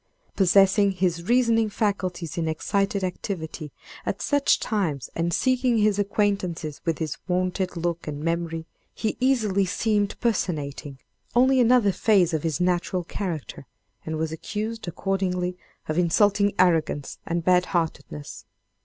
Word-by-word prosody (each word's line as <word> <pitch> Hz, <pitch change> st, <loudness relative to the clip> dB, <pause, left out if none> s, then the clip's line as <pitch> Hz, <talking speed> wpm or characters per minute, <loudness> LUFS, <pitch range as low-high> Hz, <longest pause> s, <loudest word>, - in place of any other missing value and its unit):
Possessing 195 Hz, +1 st, +4 dB
his 175 Hz, -1 st, -1 dB
reasoning 230 Hz, -3 st, +3 dB
faculties 185 Hz, -6 st, -2 dB
in 165 Hz, -2 st, -1 dB
excited 195 Hz, +5 st, -1 dB
activity, 170 Hz, -4 st, -4 dB, 0.3 s
at -, -, -3 dB
such 285 Hz, -1 st, +2 dB
times, 165 Hz, -, -2 dB
and 170 Hz, +1 st, -1 dB
seeking 255 Hz, +3 st, +2 dB
his 210 Hz, -1 st, +2 dB
acquaintances 195 Hz, -7 st, -1 dB
with 165 Hz, -2 st, 0 dB
his 160 Hz, -2 st, -3 dB
wonted 185 Hz, 0 st, -1 dB
look 170 Hz, 0 st, -2 dB
and 150 Hz, 0 st, -5 dB
memory, 165 Hz, -1 st, -2 dB, 0.3 s
he 220 Hz, -, -2 dB
easily 220 Hz, -7 st, +2 dB
seemed 205 Hz, +2 st, 0 dB
personating 150 Hz, -, -2 dB, 0.4 s
only 260 Hz, +2 st, +5 dB
another 240 Hz, -4 st, +5 dB
phase 190 Hz, -4 st, +3 dB
of 160 Hz, -, 0 dB
his 160 Hz, -3 st, -1 dB
natural 180 Hz, 0 st, 0 dB
character, 165 Hz, -7 st, -5 dB, 0.4 s
and 160 Hz, 0 st, -4 dB
was 160 Hz, 0 st, -2 dB
accused, 215 Hz, +6 st, -5 dB
accordingly, 180 Hz, 0 st, -1 dB, 0.3 s
of 155 Hz, +2 st, 0 dB
insulting 205 Hz, +3 st, +3 dB
arrogance 165 Hz, -5 st, +1 dB
and 170 Hz, 0 st, -1 dB
bad 180 Hz, 0 st, +4 dB
heartedness. 160 Hz, -4 st, -4 dB
185 Hz, 130 wpm, -25 LUFS, 165-205 Hz, 0.4 s, only